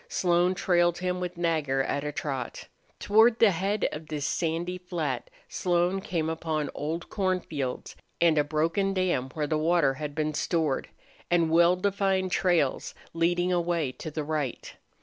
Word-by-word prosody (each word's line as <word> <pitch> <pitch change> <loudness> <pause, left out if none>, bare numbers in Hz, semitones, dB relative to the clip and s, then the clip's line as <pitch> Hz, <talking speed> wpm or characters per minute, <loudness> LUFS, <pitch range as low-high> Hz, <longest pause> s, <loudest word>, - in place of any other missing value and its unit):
Slone 180 +1 +2
trailed 175 -2 +2
him 180 0 -2
with 180 -1 -4
Nagger 155 -6 0
at 140 +1 -2
a 150 - -2
trot. 135 -4 -4 0.3
Toward 220 +3 +4
the 225 -4 +5
head 195 +4 0
of 155 +1 -7
this 150 -2 -3
sandy 170 +2 -1
flat 160 -8 -3 0.2
Slone 180 +1 0
came 165 -4 -2
upon 160 -2 -2
old 160 +3 -4
cornfields, 180 -9 -2 0.2
and 170 -2 +4
a - - +4
broken 165 +6 0
dam 175 -9 0
where 155 -2 0
the 155 +1 0
water 160 -3 +3
had 145 +1 -6
been 155 0 -1
stored, 155 -3 -1 0.4
and 170 -2 +2
well 170 +2 +5
defined 190 -1 0
trails 175 -7 +1 0.2
leading 175 +2 +1
away 170 -5 0
to 155 - -7
the 155 0 -4
right. 150 -4 -3
170 Hz, 155 wpm, -27 LUFS, 155-180 Hz, 0.4 s, the